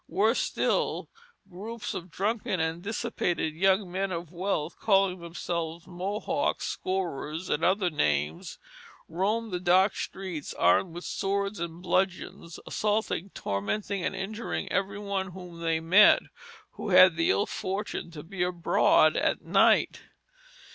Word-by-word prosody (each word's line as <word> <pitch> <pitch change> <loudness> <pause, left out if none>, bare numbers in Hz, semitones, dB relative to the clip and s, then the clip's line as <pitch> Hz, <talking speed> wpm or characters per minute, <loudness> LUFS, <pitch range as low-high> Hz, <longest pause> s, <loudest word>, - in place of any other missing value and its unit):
Worse 220 +5 +2
still, - - -1 0.4
groups 210 +5 -6
of 175 - -6
drunken 200 0 -1
and 160 +1 -1
dissipated 175 -5 -2
young 190 +2 +2
men 190 +1 -2
of 170 -2 -5
wealth, 175 -3 -2
calling 195 -3 +2
themselves 170 -1 -4
Mohocks, 205 +10 -2
Scourers, 175 -3 -3
and 150 - 0
other 185 -1 +2
names, 75 - -1 0.5
roamed 210 +6 -1
the 180 - -2
dark 185 +3 +4
streets 185 -6 -5
armed 165 - +3
with 175 - -6
swords 200 0 -2
and 170 +1 -6
bludgeons, 185 -2 -1
assaulting, 210 -3 -1
tormenting, 185 - -2
and - - -1
injuring 210 +4 -4
every 195 0 -1
one 195 -2 -3
whom 180 -2 -10
they 165 -1 0
met, 180 +6 +6 0.5
who - - -6
had 185 -2 +7
the 165 0 +1
ill 205 - +3
fortune 195 -1 -4
to 155 -3 -9
be 180 +2 -6
abroad 180 -1 +3
at - - 0
night. - - +3
185 Hz, 135 wpm, -28 LUFS, 170-200 Hz, 0.5 s, had